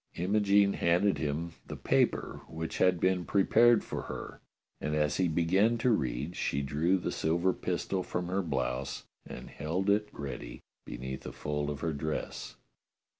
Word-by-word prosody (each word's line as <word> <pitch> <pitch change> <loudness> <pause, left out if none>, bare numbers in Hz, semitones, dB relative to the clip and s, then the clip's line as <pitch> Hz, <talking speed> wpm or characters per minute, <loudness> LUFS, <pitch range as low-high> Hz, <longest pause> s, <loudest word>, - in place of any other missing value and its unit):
Imogene 100 +2 +3
handed 90 +4 +2
him 80 +3 -2 0.2
the - - -6
paper - - +1
which 80 0 -5
had 90 -1 +4
been 95 0 +2
prepared 115 +5 +4
for - - -4
her, - - -7 0.4
and 75 +2 -2
as 75 -1 +1
he 95 - +2
began 95 +8 +2
to 125 +2 +2
read 70 - -1
she 70 +1 -1
drew 80 +7 +2
the 90 - -3
silver 85 +4 +1
pistol 95 +1 -2
from 90 0 -3
her 95 +2 0
blouse 65 -4 -2 0.2
and 60 - -9
held 90 +6 -1
it 105 +1 +1
ready - - -6 0.3
beneath 65 +2 -6
a - - -5
fold 75 0 -3
of 75 -1 -5
her 80 -2 -1
dress. 75 +2 -4
85 Hz, 160 wpm, -31 LUFS, 75-95 Hz, 0.4 s, had